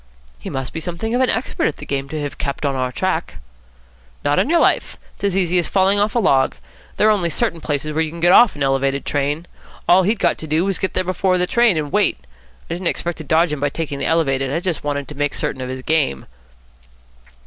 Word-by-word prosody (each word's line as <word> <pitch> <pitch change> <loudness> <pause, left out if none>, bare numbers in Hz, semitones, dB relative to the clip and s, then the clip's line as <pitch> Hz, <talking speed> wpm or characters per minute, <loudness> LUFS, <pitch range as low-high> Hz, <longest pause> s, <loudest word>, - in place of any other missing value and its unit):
"He - - -7
must 135 -1 -4
be 165 - -3
something 175 +7 -4
of 250 - +2
an 260 - +3
expert 250 - -1
at 150 - -3
the - - -9
game 140 0 -3
to 155 - -4
have 145 -1 -5
kept 140 +1 -3
on 140 - +1
our 130 -1 -1
track." - - -2 0.9
"Not 145 0 +2
on - - +1
your 340 - +4
life. - - +1 0.2
It's - - -19
as 195 -2 +1
easy 180 -1 +2
as 170 - -1
falling 195 +1 +3
off 210 +4 +1
a - - +4
log. 135 - +2 0.4
There 215 - +4
are - - +6
only 185 -5 +1
certain 170 -1 -1
places 150 0 -2
where 160 - +1
you 160 - -1
can 170 +2 -9
get 175 +1 +4
off 235 +4 +6
an 145 - -2
Elevated 135 0 0
train. 145 +3 -1 0.4
All 180 +2 +6
he'd 210 +5 +1
got - - +1
to 160 - -7
do 155 +4 +1
was 195 -2 0
to - - -14
get 190 - -2
there 185 - +2
before 185 0 +1
the 180 - +2
train, 235 -2 +3
and 150 -2 -3
wait. - - +2 0.5
I - - -4
didn't 175 +1 -3
expect 170 0 -2
to - - -6
dodge 160 +1 +2
him 150 - -3
by 145 +1 0
taking 145 -2 -4
the 140 - -1
Elevated. 135 -5 +1
I 165 - 0
just 175 -3 -3
wanted 145 -2 -2
to 150 - -8
make 145 0 -1
certain 130 - -2
of 130 - -4
his 130 0 -6
game." 150 - 0
160 Hz, 255 wpm, -20 LUFS, 140-185 Hz, 0.9 s, are